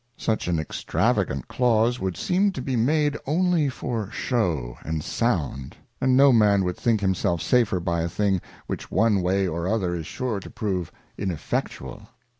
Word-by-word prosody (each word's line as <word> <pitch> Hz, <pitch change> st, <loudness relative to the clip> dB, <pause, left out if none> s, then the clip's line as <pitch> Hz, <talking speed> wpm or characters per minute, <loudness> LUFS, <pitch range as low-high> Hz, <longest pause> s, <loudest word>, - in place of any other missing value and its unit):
Such 110 Hz, -4 st, -1 dB
an 85 Hz, -2 st, +1 dB
extravagant 70 Hz, -3 st, -1 dB
Clause 120 Hz, 0 st, +2 dB
would 95 Hz, -3 st, -3 dB
seem 195 Hz, +3 st, +2 dB
to -, -, -5 dB
be 130 Hz, -, -1 dB
made 145 Hz, +5 st, +2 dB
only 170 Hz, -1 st, +2 dB
for 115 Hz, -5 st, -4 dB
shew 85 Hz, -, -1 dB
and 80 Hz, 0 st, -3 dB
sound, 80 Hz, -, -2 dB, 0.2 s
and 130 Hz, 0 st, +3 dB
no 140 Hz, -1 st, +7 dB
Man 105 Hz, -4 st, +4 dB
would 90 Hz, -1 st, -1 dB
think 115 Hz, -3 st, +1 dB
himself 95 Hz, -3 st, +1 dB
safer 110 Hz, +3 st, +2 dB
by 85 Hz, -1 st, -1 dB
a 85 Hz, -, -1 dB
thing 95 Hz, 0 st, 0 dB, 0.2 s
which -, -, -5 dB
one 110 Hz, -4 st, +3 dB
way 95 Hz, +2 st, +1 dB
or 85 Hz, +1 st, -2 dB
other 95 Hz, -4 st, 0 dB
is 80 Hz, -3 st, -4 dB
sure 125 Hz, -6 st, -3 dB
to -, -, -10 dB
prove 95 Hz, -5 st, -3 dB, 0.3 s
ineffectual. 95 Hz, -6 st, -4 dB
100 Hz, 165 wpm, -25 LUFS, 85-125 Hz, 0.3 s, no